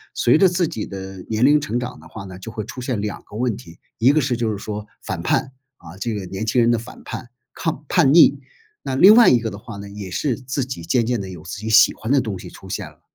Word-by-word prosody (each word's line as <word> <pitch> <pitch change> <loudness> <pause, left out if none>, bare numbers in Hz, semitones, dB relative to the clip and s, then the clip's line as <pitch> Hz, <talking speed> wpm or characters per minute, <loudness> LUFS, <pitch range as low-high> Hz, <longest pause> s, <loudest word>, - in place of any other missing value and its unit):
随 - - +4
着 195 - +7
自 175 -1 +1
己 115 -10 -5
的 95 0 -8
年 110 +2 +2
龄 150 +2 +5
成 120 -3 -2
长 125 0 -6
的 - - -15
话 110 - -9
呢， 95 -1 -10
就 115 +4 -8
会 110 -1 -5
出 125 - -8
现 125 -3 -2
两 105 0 -4
个 - - -13
问 120 -1 0
题， 85 0 -13 0.2
一 120 +4 +5
个 155 +1 +3
是 130 -2 0
就 115 -2 -1
是 105 - -3
说 105 +1 -6 0.2
反 - - -4
叛， 135 - 0 0.3
啊， 85 - -13
这 115 +1 -2
个 100 -2 -5
年 95 +3 -5
轻 120 +3 +2
人 120 0 +4
的 120 - +1
反 120 +3 -12
叛 120 - -7 0.2
抗 155 -3 -3
叛 155 -7 +4
逆， 145 -3 +6 0.4
那 130 - -3
另 190 +10 +8
外 235 +1 +8
一 125 - +5
个 115 -1 -3
的 100 - -8
话 110 0 -9
呢， 100 0 -8
也 100 -1 -8
是 130 +7 -1
自 130 +2 -3
己 130 -9 -6
渐 115 +8 +1
渐 120 -2 -1
地 95 - -7
有 90 -4 -10
自 90 +4 -7
己 110 +1 -5
喜 110 +2 +6
欢 110 - -5
的 140 - +5
东 110 -7 -3
西 - - -9
出 - - -13
现 - - -4
了。 - - -24
115 Hz, 300 characters per minute, -21 LUFS, 100-130 Hz, 0.4 s, 另